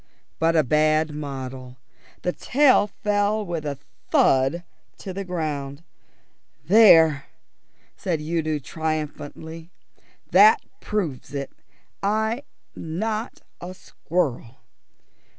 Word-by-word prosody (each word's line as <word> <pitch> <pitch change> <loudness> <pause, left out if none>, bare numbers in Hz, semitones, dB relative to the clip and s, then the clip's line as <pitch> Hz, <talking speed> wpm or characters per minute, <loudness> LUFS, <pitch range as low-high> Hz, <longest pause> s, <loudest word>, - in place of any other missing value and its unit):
But 165 +1 +2
a 155 - +4
bad 155 +2 +2
model. 130 -3 -7 0.5
The 180 - 0
tail 260 -1 +3
fell 210 +1 -1
with 165 -4 -4
a 140 -1 -4 0.3
thud 135 +6 +3 0.3
to 190 - -7
the 195 +2 -4
ground. 155 -5 -4 0.8
"There!" 165 -8 +6 0.7
said 170 -4 -2
Udo 155 0 -1
triumphantly. 160 +2 -5 0.6
"That 440 +1 +7 0.2
proves 155 -10 -4
it. 140 -1 -4 0.5
I'm 220 +5 0 0.3
not 215 +8 -4 0.2
a 180 +1 -7
squirrel." 135 -10 -3
160 Hz, 95 wpm, -23 LUFS, 145-195 Hz, 0.8 s, That